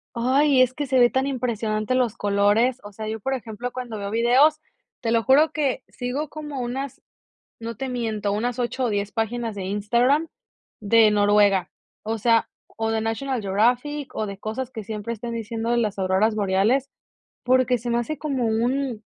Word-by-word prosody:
¡Ay! 265 Hz, +3 st, +3 dB
Es 255 Hz, 0 st, +2 dB
que 290 Hz, -, -2 dB
se 260 Hz, -1 st, +2 dB
ve 240 Hz, 0 st, +6 dB
tan 265 Hz, +1 st, 0 dB
impresionante 230 Hz, -3 st, -1 dB
los 240 Hz, -3 st, +1 dB
colores, 205 Hz, +5 st, +2 dB
o 205 Hz, -, -9 dB
sea, 215 Hz, +2 st, -7 dB
yo 220 Hz, 0 st, -4 dB
por 270 Hz, +6 st, -2 dB
ejemplo 245 Hz, -1 st, -5 dB
cuando 245 Hz, -3 st, -6 dB
veo 200 Hz, -1 st, -5 dB
videos, 255 Hz, +7 st, +4 dB, 0.4 s
te 230 Hz, -, -2 dB
lo 230 Hz, -1 st, +2 dB
juro 290 Hz, +5 st, +5 dB
que 285 Hz, -4 st, -1 dB
sigo 265 Hz, +5 st, -4 dB
como 295 Hz, -3 st, -6 dB
unas, 260 Hz, +2 st, -4 dB, 0.6 s
no 230 Hz, -1 st, -6 dB
te 265 Hz, +3 st, -4 dB
miento, 220 Hz, -5 st, -2 dB
unas 240 Hz, +4 st, -2 dB
8 250 Hz, +1 st, -1 dB
o 235 Hz, -, +1 dB
10 205 Hz, 0 st, -1 dB
páginas 225 Hz, 0 st, -2 dB
de 195 Hz, -2 st, -5 dB
Instagram 240 Hz, +10 st, +1 dB, 0.5 s
de 220 Hz, +1 st, +5 dB
Noruega, 205 Hz, -2 st, +3 dB, 0.3 s
o 225 Hz, +1 st, -2 dB
sea 230 Hz, +1 st, +3 dB, 0.3 s
o 225 Hz, 0 st, 0 dB
de 225 Hz, -, 0 dB
National 225 Hz, +3 st, -2 dB
Geographic 245 Hz, +9 st, 0 dB
o 215 Hz, -, -2 dB
de 200 Hz, -1 st, -7 dB
cosas 230 Hz, +5 st, -4 dB
que 220 Hz, -5 st, -7 dB
siempre 215 Hz, +2 st, -4 dB
estén 235 Hz, +2 st, -6 dB
diciendo 230 Hz, 0 st, -3 dB
de 240 Hz, -, +2 dB
las 210 Hz, -4 st, -1 dB
auroras 190 Hz, +4 st, +2 dB
boreales, 210 Hz, +8 st, +1 dB, 0.5 s
porque 255 Hz, 0 st, +3 dB
se 235 Hz, +2 st, -6 dB
me 235 Hz, -, +2 dB
hace 300 Hz, +6 st, -3 dB
como 275 Hz, -5 st, -2 dB
un, 235 Hz, +1 st, 0 dB
235 Hz, 185 wpm, -23 LUFS, 215-255 Hz, 0.6 s, ve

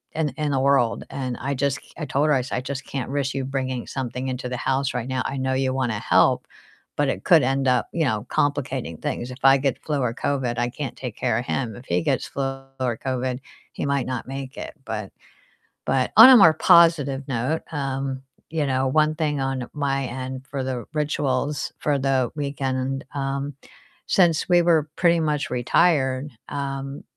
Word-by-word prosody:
in 160 Hz, -1 st, +1 dB
th -, -, -7 dB
in 150 Hz, -2 st, -1 dB
the 135 Hz, -, +1 dB
world, 135 Hz, -4 st, +2 dB
and 130 Hz, -3 st, -4 dB
I 140 Hz, +2 st, -1 dB
just 140 Hz, +1 st, 0 dB
c -, -, -20 dB
I 155 Hz, -, -4 dB
told 140 Hz, +2 st, +1 dB
her, 150 Hz, -, +4 dB
I 130 Hz, -, +2 dB
said, 125 Hz, -, -3 dB
"I -, -, -1 dB
just 135 Hz, +1 st, -5 dB
can't 135 Hz, -3 st, -4 dB
risk 140 Hz, -1 st, -1 dB
you 135 Hz, -, -2 dB
bringing 130 Hz, -2 st, -3 dB
something 130 Hz, 0 st, -4 dB
into 125 Hz, 0 st, -3 dB
the 125 Hz, -, -3 dB
house 135 Hz, +2 st, 0 dB
right 125 Hz, -1 st, -3 dB
now. 130 Hz, -1 st, -1 dB
I 135 Hz, -, -3 dB
know 130 Hz, 0 st, -1 dB
you 130 Hz, 0 st, 0 dB
wanna 125 Hz, -5 st, -1 dB
help, -, -, +3 dB, 0.5 s
but 145 Hz, -1 st, +2 dB
it -, -, -3 dB
could 165 Hz, -4 st, +6 dB
end 135 Hz, +1 st, +1 dB
up, 125 Hz, -, +2 dB
you 165 Hz, -2 st, +1 dB
know, 110 Hz, -3 st, -1 dB
complicating 135 Hz, -, -1 dB
things. 120 Hz, +9 st, -4 dB
If 125 Hz, -, -10 dB
I 135 Hz, 0 st, +7 dB
get 135 Hz, -2 st, -2 dB
flu 150 Hz, -2 st, -1 dB
or 115 Hz, -2 st, 0 dB
COVID, 125 Hz, -4 st, -1 dB
I 120 Hz, -, +1 dB
can't 135 Hz, 0 st, -5 dB
take 125 Hz, -5 st, -6 dB
care 110 Hz, -, +1 dB
of 120 Hz, -, -5 dB
him. 115 Hz, -5 st, -2 dB
If 120 Hz, -, -12 dB
he 85 Hz, 0 st, +1 dB
gets -, -, 0 dB
flu 140 Hz, -, -3 dB, 0.3 s
or 125 Hz, -3 st, 0 dB
COVID, 130 Hz, 0 st, -2 dB, 0.3 s
he -, -, -3 dB
might 140 Hz, -2 st, 0 dB
not 130 Hz, -2 st, -4 dB
make 135 Hz, 0 st, -6 dB
it," -, -, -6 dB
but 105 Hz, -3 st, -5 dB, 0.8 s
but 130 Hz, -1 st, +1 dB
on 225 Hz, +4 st, +12 dB
a 260 Hz, -, +10 dB
more 165 Hz, -7 st, +8 dB
positive 150 Hz, -5 st, +4 dB
note, 135 Hz, +6 st, -1 dB
um, 135 Hz, -2 st, -3 dB, 0.3 s
you 155 Hz, -2 st, 0 dB
know, 130 Hz, 0 st, +1 dB
one 155 Hz, +3 st, +2 dB
thing 150 Hz, -2 st, -1 dB
on 135 Hz, -2 st, -2 dB
my 140 Hz, -2 st, -1 dB
end 130 Hz, +1 st, -6 dB
for 135 Hz, -2 st, -3 dB
the 130 Hz, -2 st, -3 dB
rituals 145 Hz, -2 st, -1 dB
for 145 Hz, -2 st, +1 dB
the 130 Hz, -2 st, +1 dB
weekend, 135 Hz, -2 st, -2 dB
um, 140 Hz, 0 st, -3 dB, 0.5 s
since 170 Hz, -4 st, +3 dB
we 175 Hz, -1 st, +6 dB
were 160 Hz, -3 st, +3 dB
pretty 170 Hz, -2 st, +4 dB
much 150 Hz, -2 st, -1 dB
retired, 130 Hz, +1 st, +2 dB, 0.2 s
um, 140 Hz, -1 st, -4 dB
135 Hz, 205 wpm, -23 LUFS, 130-145 Hz, 0.8 s, on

